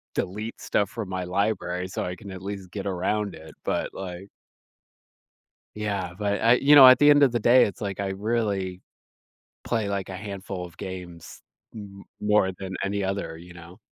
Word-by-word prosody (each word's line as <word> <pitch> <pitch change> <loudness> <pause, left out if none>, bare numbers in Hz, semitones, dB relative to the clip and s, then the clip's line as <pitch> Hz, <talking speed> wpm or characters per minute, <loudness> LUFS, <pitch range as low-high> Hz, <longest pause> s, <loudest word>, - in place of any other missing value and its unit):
delete 105 +5 -4
stuff 100 -1 0
from 110 -5 -5
my 95 -1 -3
library 90 -1 -1
so 95 - -4
I 90 - -4
can 100 +3 -11
at 95 -1 -8
least 95 -2 -7
get 100 -1 -5
around 100 +2 -1
it, 80 -1 -12
but, - - -1
like 95 +1 -7 1.5
Yeah, 100 -4 -3
but 100 0 -1
I 115 +1 +6
you 140 +4 +5
know, 135 -3 +11
at 130 -1 +8
the 145 - +6
end 145 0 +6
of 135 - +5
the 120 - 0
day, 120 +4 +6
it's, 100 - -6
like, 100 -2 -4
I 100 -1 -1
really 100 -3 -2 0.8
play, 110 -4 -1
like, 100 -1 -2
a 95 - -5
handful 95 -2 -6
of 85 -1 -14
games, 90 -3 -8 0.3
m 100 -2 -10 0.2
more 105 -2 +3
than 95 -1 -6
any 100 0 -1
other, 95 -4 -3
you 90 +1 -13
know. 85 +2 -13
100 Hz, 185 wpm, -25 LUFS, 90-105 Hz, 1.5 s, know